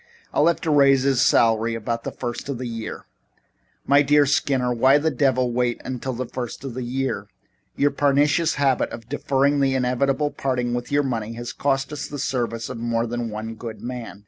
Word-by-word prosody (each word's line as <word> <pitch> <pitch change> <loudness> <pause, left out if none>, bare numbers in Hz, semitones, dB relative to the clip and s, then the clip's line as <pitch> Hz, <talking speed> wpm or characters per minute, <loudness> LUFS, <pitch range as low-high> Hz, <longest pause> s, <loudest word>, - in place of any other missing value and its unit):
I'll 150 - +3
have 170 - +2
to 160 - 0
raise 135 -2 +5
his 135 -2 +2
salary 115 -1 +3
about 115 +1 -3
the - - -3
first 120 +2 -5
of 140 - -2
the 130 - -5
year. 115 -2 -6 0.8
"My 140 +1 +5
dear 145 0 +4
Skinner, 135 -3 +1
why 130 +4 +5
the 160 +2 0
devil 130 -2 +1
wait 120 0 0
until 130 0 -4
the 130 +2 -3
first 125 +1 -6
of 135 -3 -5
the 130 - -5
year? 120 -4 -2 0.5
Your 145 0 +2
pernicious 145 +3 +2
habit 135 -3 +1
of 115 -1 -9
deferring 140 0 +1
the 135 -1 +2
inevitable 135 +3 +1
parting 125 -3 -1
with 120 +2 -4
money 125 -6 0
has 120 0 -6
cost 135 +1 -1
us 150 - -4
the 145 - -7
services 120 -3 -2
of 130 - -6
more 115 0 0
than 120 0 -3
one 110 +1 -5
good 110 -2 -8
man. 120 -5 -6
130 Hz, 195 wpm, -23 LUFS, 120-140 Hz, 0.8 s, raise